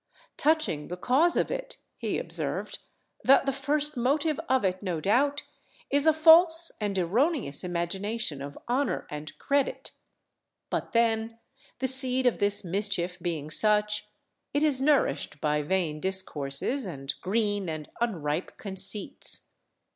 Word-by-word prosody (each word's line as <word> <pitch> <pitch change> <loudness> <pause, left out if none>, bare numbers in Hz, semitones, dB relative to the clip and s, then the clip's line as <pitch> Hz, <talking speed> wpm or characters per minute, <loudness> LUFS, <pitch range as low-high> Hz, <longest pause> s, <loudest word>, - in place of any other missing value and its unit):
Touching 305 - +1
the 180 - -6
cause 285 - +3
of - - 0
it," - - -5 0.2
he - - -2
observed, - - -4 0.4
"that 275 +1 +5
the 275 - +1
first 290 +2 -1
motive 285 +5 0
of 260 -5 +2
it, 185 0 -1
no 180 -5 -2
doubt, 275 - +1 0.5
is 285 +2 +2
a - - +8
false 325 +1 +6
and 205 -2 -1
erroneous 215 - 0
imagination 180 -1 -2
of 140 +1 -7
honour 245 -5 0
and 150 +1 -7
credit; 280 -1 -1 0.8
but - - -3
then, 230 -1 +1 0.4
the 260 - -1
seed 260 0 +2
of 245 - +2
this 205 0 +1
mischief 185 -1 0
being 155 -4 -4
such, 210 +2 +2 0.5
it 290 - +2
is 285 -4 +3
nourished 280 - +1
by 150 0 0
vain 155 -1 -1
discourses 190 - -1
and 135 -5 -4
green 205 -2 -1
and 155 -2 -6
unripe 165 -8 -2
conceits. 200 -2 -1
210 Hz, 135 wpm, -27 LUFS, 175-275 Hz, 0.8 s, a